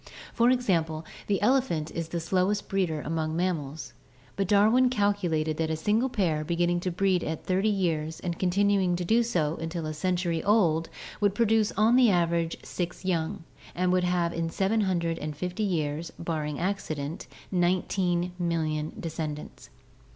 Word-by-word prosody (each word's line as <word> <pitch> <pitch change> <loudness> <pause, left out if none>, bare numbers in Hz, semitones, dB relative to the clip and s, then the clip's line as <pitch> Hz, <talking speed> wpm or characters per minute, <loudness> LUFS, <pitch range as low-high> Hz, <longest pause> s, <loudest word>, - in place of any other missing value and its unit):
For 235 +1 +4
example, 165 -11 +1 0.2
the 200 -2 +1
elephant 215 - +1
is 165 -1 -4
the 170 - -3
slowest 190 +4 0
breeder 180 -6 0
among 160 0 -2
mammals, 160 -6 -2 0.4
but 195 -2 -1
Darwin 220 +6 +5
calculated 180 -9 0
that 160 -1 0
a 160 - 0
single 210 +10 +1
pair 170 -10 0
beginning 175 +2 +1
to 180 - -2
breed 180 0 +1
at 160 0 -4
thirty 190 +3 +2
years 160 -6 -1
and 170 -2 -4
continuing 190 0 +2
to 175 0 -3
do 225 +6 +4
so 170 -9 0
until 165 0 -4
a 155 - -3
century 175 +1 -1
old 175 -6 +3 0.3
would 205 -2 +2
produce 220 -1 +3
on 220 +4 +4
the 250 -3 +6
average 170 -2 +1
six 180 +1 -5
young 165 -3 -1 0.3
and 180 +1 +1
would 185 0 +2
have 175 -1 +1
in 165 0 -2
750 180 -3 -1
years, 165 -5 -1
barring 155 -3 -3
accident, 165 -5 -3 0.2
nineteen 180 0 +1
millions 160 -3 -1
of - - -8
descendants. 155 -2 -6
175 Hz, 150 wpm, -27 LUFS, 160-195 Hz, 0.4 s, the